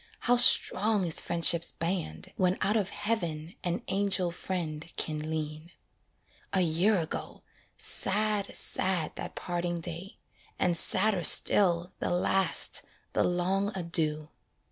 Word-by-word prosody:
how 245 - +2
strong 215 -4 +4
is 165 - +1
friendship's 170 0 +2
band, 165 - -5
When 185 0 0
out 210 - 0
of 205 -3 -1
heaven 170 -7 -4
an 180 +6 -3
angel 190 -3 -1
friend 170 -3 -6
can 155 0 -3
lean. 155 +1 -6 0.8
A 190 - +3
year 180 +5 +1
ago! 160 -3 -5 0.3
sad, 210 0 -1
sad 185 -4 -1
that - - -8
parting 175 -1 -4
day, 170 +3 -6 0.4
And 175 -2 0
sadder 190 +2 +1
still, 175 +1 +6
the - - -3
last, 180 0 +3 0.3
the - - +1
long 190 +3 -1
adieu. 155 -3 -1
175 Hz, 120 wpm, -28 LUFS, 165-195 Hz, 0.8 s, still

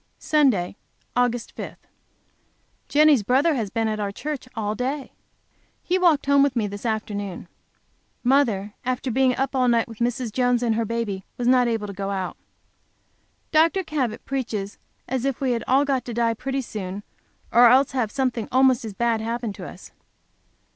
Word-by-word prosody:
Sunday, 250 - +2 0.4
Aug. 245 -1 0
5. - - -6 1.1
Jenny's 300 -4 +5
brother 270 - +3
has 225 -7 -2
been 225 +1 -1
at 215 -1 -2
our 200 -1 -2
church 285 +3 -5
all 210 -1 -1
day. 265 +5 -3 0.7
He 365 +1 +1
walked 335 -6 +3
home 280 0 +4
with 280 -2 +2
me 225 -3 +1
this 205 +3 -5
afternoon. 205 -4 -3 0.8
Mother, 235 -7 +2
after 255 +1 -2
being 260 +1 +3
up 270 +1 -2
all 255 -1 +3
night 235 -2 +3
with 225 -2 -11
Mrs. 240 0 -1
Jones 245 +1 +1
and 230 -2 +2
her 225 +1 0
baby, 215 -4 -3
was 245 - -1
not 250 -1 +5
able 225 -3 -1
to 200 - -6
go 195 +1 -4
out. 190 -2 -3 1.2
Dr. 330 +4 +3
Cabot 265 -9 -2
preaches 225 -7 -3 0.3
as 260 -1 -2
if 275 -2 -1
we 265 -2 0
had 235 -1 -1
all 270 +3 +4
got 270 -3 0
to 240 - -5
die 230 -1 +2
pretty 270 +4 -3
soon, 205 -4 -6 0.5
or 240 +1 +7
else 260 +3 +5
have 250 -5 0
something 255 -5 -1
almost 260 -1 +4
as 220 -2 -6
bad 230 0 +1
happen 230 -1 -3
to - - -8
us. - - -13
245 Hz, 175 wpm, -24 LUFS, 220-265 Hz, 1.2 s, or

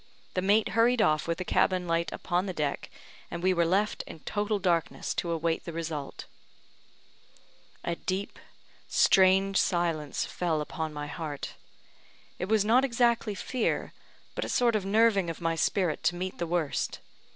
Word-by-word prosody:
The 185 - 0
mate 205 +3 +3
hurried 235 +2 +3
off 155 -6 +2
with 170 0 -1
the 185 - -4
cabin 185 0 +2
light 170 0 0
upon 180 +2 -1
the 185 - -4
deck, 150 -2 -2 0.4
and 170 0 -6
we 185 0 +4
were 170 -2 +2
left 200 +4 +1
in 160 - -10
total 210 +4 -1
darkness 175 -4 0
to 170 - -2
await 165 0 -1
the 170 - -7
result. 160 -4 -5 1.6
A 170 - -1
deep, 190 +3 -4 0.5
strange 195 +1 +4
silence 165 -5 0
fell 170 -3 -1
upon 155 +1 -4
my 150 -1 -5
heart. 150 -1 -5 0.9
It 180 - -1
was 215 -2 +3
not 240 +5 +5
exactly 235 -4 +1
fear, 245 +4 -2 0.4
but - - -3
a - - -4
sort 240 -2 +2
of 205 -3 0
nerving 205 -3 +3
of 165 - -5
my 165 -1 0
spirit 165 +1 0
to 175 - +3
meet 185 +1 -4
the 170 - -1
worst. 165 -4 -1
180 Hz, 165 wpm, -28 LUFS, 165-205 Hz, 1.6 s, not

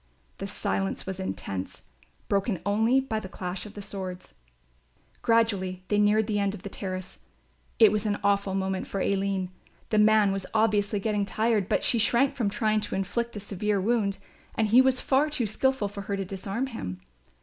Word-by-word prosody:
The - - -4
silence 95 0 -2
was 190 0 -5
intense, 95 - -5 0.4
broken 200 -1 0
only 220 +6 +3
by 245 -5 -2
the 190 - -8
clash 180 +2 -5
of 210 - -13
the 205 - -7
swords. 185 - -7 0.9
Gradually 200 -6 +1
they 205 - +2
neared 210 +1 +4
the 210 -1 0
end 200 0 0
of 185 - -12
the 200 - -5
terrace. 185 -1 -6 0.6
It 220 -3 +7
was 210 0 0
an 205 -1 0
awful 200 -1 +2
moment 190 -1 -1
for 195 - -3
Aline. 195 -1 0 0.4
The 215 - +4
man 210 -1 +5
was 195 -1 -3
obviously 210 -2 +2
getting 210 0 0
tired, 215 -1 0
but - - +1
she 235 - +3
shrank 240 +5 +3
from 225 -5 0
trying 215 +1 +1
to 210 - -4
inflict 235 +5 -2
a - - -3
severe 205 0 -1
wound 200 -1 +1 0.4
and 220 -1 +2
he 240 +4 +7
was 260 -1 +3
far 280 +3 +2
too 280 -6 0
skilful 260 +1 +1
for 200 0 -7
her 200 0 -3
to 195 - -2
disarm 195 +6 -3
him. 95 - -6
205 Hz, 185 wpm, -27 LUFS, 195-220 Hz, 0.9 s, It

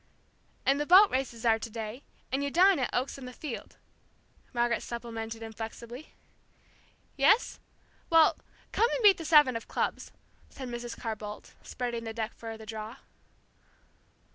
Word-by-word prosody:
"And 275 +1 +3
the 295 - -2
boat 385 +3 +8
races 250 -3 -2
are 225 -1 +4
to 225 - -6
day, 225 +2 -6 0.3
and 270 +2 0
you 285 - 0
dine 365 +2 +5
at 255 - 0
Oaks 260 +2 -2
in 260 - -8
the 250 - -7
Field," 270 -2 -7 0.7
Margaret 240 -1 +1
supplemented 225 -1 -6
inflexibly. 225 +4 -8 1.0
"Yes? 395 - +3 0.5
Well, 325 -1 +6 0.4
come 465 - +3
and - - -1
beat 400 -3 +7
the 330 - -6
seven 295 -6 +6
of 230 - -5
clubs," - - -2 0.4
said 260 -2 -8
Mrs. 240 0 -6
Carr 225 -2 -3
Boldt, 210 0 -9
spreading 240 -2 -4
the 225 -1 -5
deck 225 -1 -3
for 225 -1 -8
the 220 - -11
draw. 220 +1 -6
240 Hz, 155 wpm, -29 LUFS, 225-280 Hz, 1.0 s, boat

